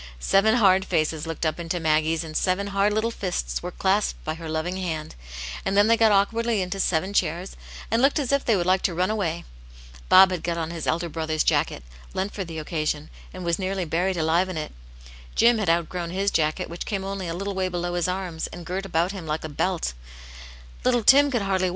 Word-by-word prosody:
^ - - -13 0.2
Seven 195 - +3
hard 190 -5 +5
faces 155 -3 -1
looked 165 0 -3
up 155 +1 -1
into 170 +1 -2
Maggie's, 160 0 +1
and 155 -1 -9
seven 185 +3 +1
hard 200 +1 +3
little 220 +2 0
fists - - -3
were - - -4
clasped - - 0
by - - -1
her 165 0 -8
loving 160 +4 -2
hand; 160 -5 -4 0.5
and 195 +1 0
then 205 - +6
they 230 +1 +5
got 225 -1 +4
awkwardly 225 +3 +2
into 185 +2 -4
seven 185 +1 0
chairs^ 175 0 0 0.4
and 225 +1 +2
looked 275 +3 +4
as 280 -4 -1
if 280 0 +2
they 225 - +3
would 175 -3 0
like 185 +1 +3
to 175 - -1
run 185 +4 +1
away. 170 -6 -2 0.6
Bob 190 0 +8
had 180 -3 -2
got 170 0 -2
on 165 0 -3
his 165 -2 -5
elder 170 +1 0
brother's 160 -1 -1
jacket, - - +1 0.3
lent 195 +2 -2
for 195 - -3
the 165 -2 -8
occasion, 155 -1 -3 0.2
and 185 -1 -8
was 170 +1 0
nearly 190 -1 -2
buried 175 +4 0
alive 165 +3 +2
in 180 - -4
it. 155 - -4 0.6
Jim 235 -1 +5
had 200 -5 0
outgrown 170 +1 0
his 195 +3 0
jacket, 155 -1 0
which 170 +1 -7
came 195 -2 -2
only 195 -1 -4
a 165 - -3
little 200 +2 -3
way 190 -1 0
below 175 0 -3
his 175 -1 0
arms, 180 -3 -3
and 175 -1 -10
girt 185 +3 -3
him - - -8
about 170 +3 +2
Uk^ 160 -6 -4
a 155 - -5
belt 165 - -1 0.9
Little 245 -2 +2
Tim 285 +5 +7
could 240 -6 0
harA\v 190 -1 +1
>Ni»? - - +1
180 Hz, 225 wpm, -24 LUFS, 160-195 Hz, 0.9 s, Bob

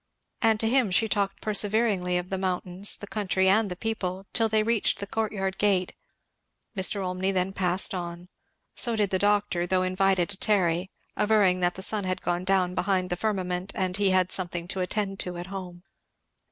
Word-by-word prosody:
And 225 -2 +3
to 225 - +1
him 250 -2 +2
she 205 +5 +2
talked 200 -2 -2
perseveringly, 205 -3 +1
of 180 +1 -4
the 190 - -2
mountains, 185 +1 +1
the - - -8
country, 195 -2 0
and 205 +2 +3
the 180 - -4
people, 190 -3 -4
till 225 -1 +3
they 215 0 +2
reached 230 -1 +1
the 200 - -4
courtyard 200 -2 -3
gate. 190 -3 +1 0.8
Mr. 195 +1 +1
Olmney 185 +1 -1
then 190 0 0
passed 185 0 +2
on. 175 -1 -6 0.5
So 235 -2 +3
did 205 -3 0
the 190 - +1
doctor, 205 -3 +1
though 185 0 +1
invited 185 -1 +1
to 200 - 0
tarry, 185 -4 +1 0.3
averring 205 -4 +3
that 175 0 +1
the 190 - -5
sun 205 -1 0
had 185 0 -3
gone 175 +1 -2
down 185 -2 +2
behind 185 -1 -1
the - - +1
firmament 185 -2 -2
and 185 -1 -1
he 200 -1 +2
had 185 -1 +2
something 175 -2 -1
to 195 - -2
attend 195 +1 -2
to 180 -1 -4
at 175 - -6
home. 180 -2 -8
190 Hz, 190 wpm, -26 LUFS, 180-205 Hz, 0.8 s, And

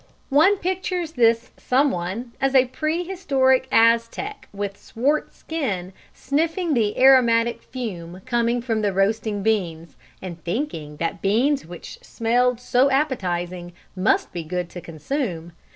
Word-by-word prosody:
One 315 +9 +5
pictures 365 -2 -2
this 235 -4 +2
"someone," 235 -4 0
a 270 -1 +4
pre 310 +7 -2
historic 270 -9 +1
Aztec 230 - +2
with 200 0 -4
swart 275 +9 -1
skin, 195 - -4 0.2
sniffing 325 +4 -1
the 215 -5 +1
aromatic 235 -3 +4
fume 185 -8 -7
coming 240 -1 0
from 225 -3 -1
the 205 -2 0
roasting 205 +1 0
beans, 170 -7 -1 0.2
and 170 -3 -8
thinking 170 - -4
that 165 +1 -3
beans 240 - +1
which 175 -1 -10
smelled 245 +1 +1
so 250 +2 +2
appetising 180 - -2 0.2
must 185 +2 +1
be 170 - -4
good 175 +2 -4
to 175 - -8
consume. 170 - -4
230 Hz, 125 wpm, -23 LUFS, 185-270 Hz, 0.2 s, One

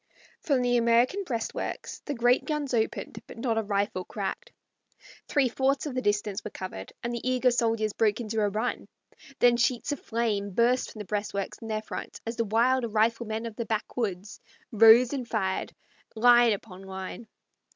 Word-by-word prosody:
From 270 -5 +1
the 245 0 +3
American 235 +11 +3
breastworks 230 -7 -4
the 290 - -3
great 245 +1 +3
guns 300 -4 -2
opened, 225 -2 -1
but - - -11
not 230 -1 0
a - - +1
rifle 200 -2 -1
cracked. 220 - -5 0.8
Three 280 -3 +3
fourths 265 +4 0
of 290 - -4
the 255 - -1
distance 205 -2 -1
were - - -5
covered, 185 - -7
and 235 0 -2
the 235 - -3
eager 255 0 +2
soldiers 225 -3 +1
broke 215 -1 +1
into 220 -1 -2
a 205 - +2
run; 220 +5 -2 0.5
then 240 -1 +5
sheets 240 +3 +1
of 290 - -3
flame 210 -4 -2
burst 245 +2 +2
from - - -13
the 210 - -6
breastworks 205 0 -3
in 225 - -8
their 215 -1 -2
front - - -7
as 230 +1 -3
the 230 - 0
wild 235 +2 +2
riflemen 225 +1 0
of 230 -2 -6
the 235 - -2
backwoods 210 -2 -3 0.3
rose 225 +4 +7
and 255 -4 -3
fired, 190 -5 -1 0.4
line 240 0 +6
upon 195 -2 -8
line. 190 +4 -7
230 Hz, 175 wpm, -27 LUFS, 210-245 Hz, 0.8 s, rose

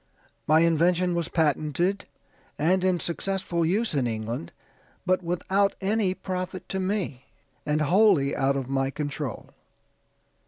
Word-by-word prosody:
"My 155 +1 +5
invention 170 +2 +3
was 170 -1 -1
patented, 160 +4 0 0.5
and 180 +5 +2
in 185 -2 +2
successful 175 0 -2
use 205 +7 +1
in 135 -4 +1
England, 110 -4 -4 0.5
but 185 0 +2
without 190 +3 0
any 195 -1 0
profit 185 -1 -5
to 190 - -2
me, 185 -9 -2 0.4
and 150 +1 +1
wholly 170 -3 +4
out 135 0 +1
of 135 -2 -3
my 135 0 0
control. 145 -4 -5
170 Hz, 125 wpm, -26 LUFS, 145-185 Hz, 0.5 s, My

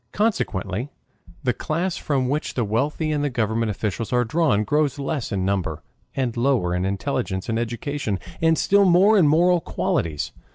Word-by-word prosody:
Consequently 125 - -1 0.5
the 125 - +1
class 170 +7 -2
from 135 -4 -1
which 145 +4 -2
the 120 - +1
wealthy 145 +9 -1
and 145 -1 0
the 145 - +1
government 115 -2 0
officials 105 +2 -3
are 125 -1 +2
drawn 130 -5 +2
grows 145 +3 +1
less 140 -3 -3
in 95 -3 -1
number 90 -6 -2 0.3
and 125 -4 -1
lower 120 -8 +1
in 90 +1 0
intelligence 100 0 -2
and 115 0 0
education, 120 -1 -2 0.2
and 160 0 +3
still 200 0 +4
more 190 +4 +5
in 180 -7 +5
moral 170 +3 +4
qualities. 80 - -2
130 Hz, 165 wpm, -23 LUFS, 105-155 Hz, 0.5 s, more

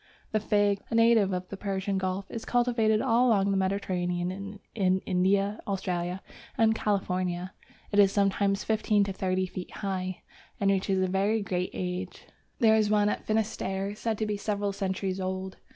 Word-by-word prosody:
The 215 - +2
Fig, 205 -1 +2
a - - -2
native 230 -3 +5
of 180 0 -3
the 200 - -6
Persian 195 -1 -2
Gulf, 190 +1 -2
is 230 - -5
cultivated 235 -3 +2
all 250 0 +3
along 200 -4 +3
the - - +1
Mediterranean 180 -2 -1
and 200 +2 -7
in 190 -3 +2
India, 195 +3 +1
Australia, 185 -2 -2 0.3
and 220 -1 +4
California. 185 -4 -1 0.4
It 205 - +2
is 195 -1 +6
sometimes 200 0 +1
fifteen 215 -1 +2
to 195 -1 -3
thirty 185 0 0
feet 180 0 -7
high, 185 -2 -4 0.4
and 195 -1 +3
reaches 190 -1 +1
a - - +1
very 200 +4 +1
great 180 -2 -1
age. 180 0 -4 0.3
There 220 -2 +5
is 215 -1 +2
one 210 -1 +3
at - - -3
Finisterre 205 -2 -1
said 220 +1 -2
to 220 - -1
be 210 -1 -2
several 205 -1 -2
centuries 190 -1 -2
old. 190 0 -4
195 Hz, 170 wpm, -28 LUFS, 185-210 Hz, 0.4 s, is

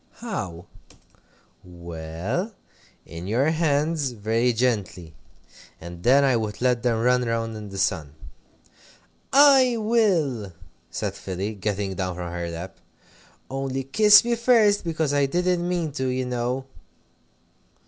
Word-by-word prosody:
"How?" 90 - -6 1.0
"Well 85 - -5 0.5
in 85 +2 -8
your 130 +9 +1
hands, 155 -3 0
very 115 +3 0
gently. 105 -9 -2 0.7
And 85 +1 -10
then 135 +7 +4
I 135 -2 +3
would 110 -2 -3
let 125 -1 +1
them 115 -2 0
run 125 0 +3
round 115 -1 -2
in 105 -1 -8
the 95 - -8
sun." 80 -6 -1 1.2
"I 270 -3 +6
will!" 175 - +1 0.4
said - - -3
Philly, 95 +3 -5
getting 100 -1 -3
down 90 -1 -3
from 90 -1 -6
her 85 0 -4
lap. 85 +3 -8 0.7
"Only 135 0 -3
kiss 210 - +6
me 240 - +1
first, 230 -3 +3
because 160 -4 -1
I 140 -1 +2
didn't 175 +2 0
mean 170 -4 -1
to, 130 -2 -3
you 130 0 -1
know!" 125 +1 -2
125 Hz, 130 wpm, -24 LUFS, 95-160 Hz, 1.2 s, I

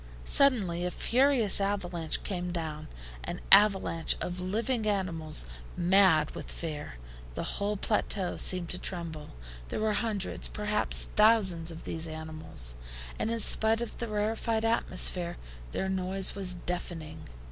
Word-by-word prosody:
Suddenly 205 -12 +2
a 180 - -1
furious 245 -1 +3
avalanche 180 -5 -1
came 180 -2 -4
down, 155 -3 -5 0.4
an - - -5
avalanche 195 -5 +6
of 180 0 -4
living 220 +4 -1
animals 165 - -2 0.3
mad 175 -4 +4
with - - -8
fear. 150 - -6 0.4
The - - -3
whole 205 +1 -2
plateau 200 -2 -1
seemed 180 -2 +1
to 180 - -1
tremble. 165 -4 -4 0.4
There - - -3
were 215 0 +1
hundreds, 210 -3 -1
perhaps 210 0 0
thousands, 200 -7 +4
of 165 -1 -9
these 165 0 -5
animals, 155 - -1 0.5
and - - -1
in 230 0 -1
spite 220 +1 +4
of 235 - -6
the 235 - -3
rarefied 220 +1 -1
atmosphere, 185 -6 +1 0.3
their 190 - -2
noise 190 0 0
was 185 -2 0
deafening. 175 -3 -6
185 Hz, 135 wpm, -29 LUFS, 170-210 Hz, 0.5 s, avalanche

